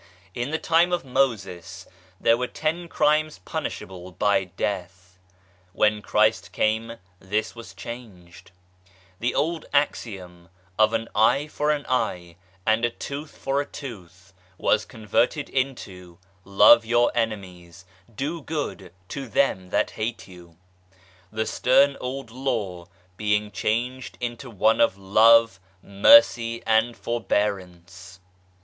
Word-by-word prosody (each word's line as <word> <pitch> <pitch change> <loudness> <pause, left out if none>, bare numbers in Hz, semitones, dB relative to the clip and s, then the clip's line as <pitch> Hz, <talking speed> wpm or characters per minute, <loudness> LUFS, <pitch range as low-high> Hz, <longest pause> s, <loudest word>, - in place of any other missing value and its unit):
In 120 +6 -3
the 160 - -1
time 170 +2 +2
of 175 -4 -1
Moses, 110 -10 -2 0.3
there 115 - +4
were 125 +1 -2
ten 165 +5 -3
crimes 155 -3 +1
punishable 90 -1 -6
by 95 +2 +1
death. 90 -1 -5 0.5
When 105 +1 +2
Christ 105 -2 +1
came 110 +2 0 0.3
this 105 +3 -2
was 115 -5 -12
changed; 90 -4 -11 0.7
the 120 +1 -1
old 165 +1 -1
axiom 95 - -2 0.2
" 95 +1 -29
an 115 +1 +2
eye 125 +7 +3
for 150 0 -2
an 150 -2 0
eye, 90 -9 -2 0.3
and 110 +1 +2
a 120 - +3
tooth 140 +5 -8
for 135 +1 -1
a - - -5
tooth 95 -7 -11
" 95 0 -33
was 105 -1 +1
converted 120 +7 -1
into 95 -10 -4
" 95 -1 -36 0.2
Love 115 - +9
your 120 +1 +2
enemies, 95 -6 -4 0.3
do 150 +8 -3
good 145 - -5 0.2
to 135 -2 -6
them 100 -6 0
that - - 0
hate 115 +2 -4
you/' 90 -3 -15 0.8
the 110 +1 -2
stern 140 +5 +3
old 130 -1 -5
law 105 -9 -3 0.3
being 105 0 0
changed 120 +6 -2
into 120 +2 -5
one 110 +1 +2
of 95 - +3
love, 110 +2 +5 0.2
mercy 115 +3 +5
and 110 +2 +2
forbearance 95 -5 -3
110 Hz, 130 wpm, -24 LUFS, 95-125 Hz, 0.8 s, Love